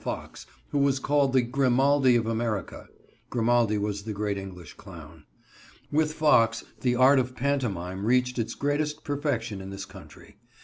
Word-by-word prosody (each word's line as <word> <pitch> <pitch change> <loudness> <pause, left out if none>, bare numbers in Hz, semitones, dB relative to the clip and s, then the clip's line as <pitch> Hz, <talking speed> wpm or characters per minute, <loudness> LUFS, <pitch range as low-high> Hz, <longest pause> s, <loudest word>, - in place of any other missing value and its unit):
Fox, - - -6 0.2
who 145 - 0
was 140 -1 +2
called 140 0 +1
the 130 -1 +3
"Grimaldi 135 +1 +3
of 115 -1 +1
America." 115 -2 -3 0.4
Grimaldi 115 -2 +2
was 100 -1 -2
the 110 +1 -5
great 105 0 -2
English 95 -3 -9
clown. 80 -4 -13 0.7
With 155 +1 +1
Fox 115 -7 +3 0.2
the 125 -1 +1
art 130 +2 +5
of 125 0 -3
pantomime 100 -9 -2
reached 125 +2 +1
its 115 - -3
greatest 145 +1 -2
perfection 130 -8 -2
in 95 - -8
this 100 0 -7
country. 100 +1 -15
120 Hz, 150 wpm, -26 LUFS, 100-135 Hz, 0.7 s, art